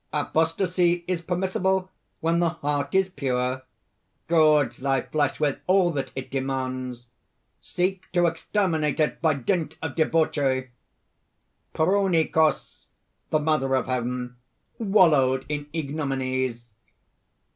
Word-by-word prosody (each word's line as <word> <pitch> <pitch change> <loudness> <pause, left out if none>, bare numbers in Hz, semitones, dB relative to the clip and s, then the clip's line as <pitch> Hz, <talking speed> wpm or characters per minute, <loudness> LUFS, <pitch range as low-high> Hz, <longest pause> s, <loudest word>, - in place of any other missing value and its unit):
Apostasy 170 +3 +1
is 180 -2 -1
permissible 185 +1 -1 0.3
when 165 +1 +1
the 170 -1 +3
heart 145 -2 -2
is 190 0 +4
pure. 130 -4 -2 0.7
Gorge 155 -3 +4
thy 135 0 0
flesh 145 -3 -1
with 145 -3 0
all 185 -1 +4
that 135 -4 -3
it 130 -1 -6
demands. 130 -2 -3 0.6
Seek 185 +1 -2
to 175 -1 +3
exterminate 165 -2 0
it 155 - 0
by 160 -3 +3
dint 160 +5 -2
of 160 -4 -4
debauchery! 145 -5 +1 1.0
Prounikos, 165 -3 +1 0.4
the 155 - +2
Mother 150 -3 +1
of 130 - 0
Heaven, 125 0 -3 0.4
wallowed 150 - +3
in 145 -1 -4
ignominies." 130 -6 -3
150 Hz, 110 wpm, -25 LUFS, 130-170 Hz, 1.0 s, is